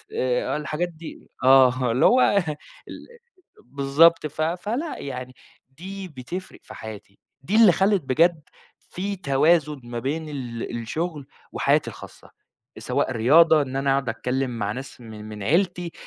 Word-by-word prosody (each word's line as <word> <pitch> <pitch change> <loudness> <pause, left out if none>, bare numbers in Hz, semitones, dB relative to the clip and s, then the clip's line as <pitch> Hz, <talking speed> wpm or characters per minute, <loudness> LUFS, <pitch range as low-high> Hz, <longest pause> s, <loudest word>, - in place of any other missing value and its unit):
آآ، 125 +3 0
الحاجات 150 +4 -3
دي، 165 -1 -12
آه، 130 -1 +5
اللي 125 - +2
هو 255 +1 +5 0.7
ال - - -10 0.6
بالضبط، 140 +5 +3
ف 155 +1 -7
فلأ 210 - -2
يعني، 130 -2 -7 0.4
دي 190 +3 -7
بتفرِق 170 +5 -8
في - - -12
حياتي، 105 -2 -10 0.2
دي 180 +10 -2
اللي 220 -4 +7
خلّت 195 +1 +2
بجد 160 +5 +2 0.4
فيه 200 +2 -5
توازُن 150 0 +2
ما 120 0 -6
بين 155 +5 -3
ال 120 -4 -5
الشغل 155 +3 -4 0.2
وحياتي - - +1
الخاصَّة، - - -13 0.5
سواء - - -1
رياضة، 150 +7 +5
إن 135 -2 -5
أنا 135 0 +1
أقعُد 135 -3 0
أتكلّم 125 +3 -2
مع 100 0 -1
ناس 130 +1 -8
من 110 -2 -10
من 105 -1 -8
عيلتي، 175 - 0
140 Hz, 140 wpm, -23 LUFS, 125-170 Hz, 0.7 s, اللي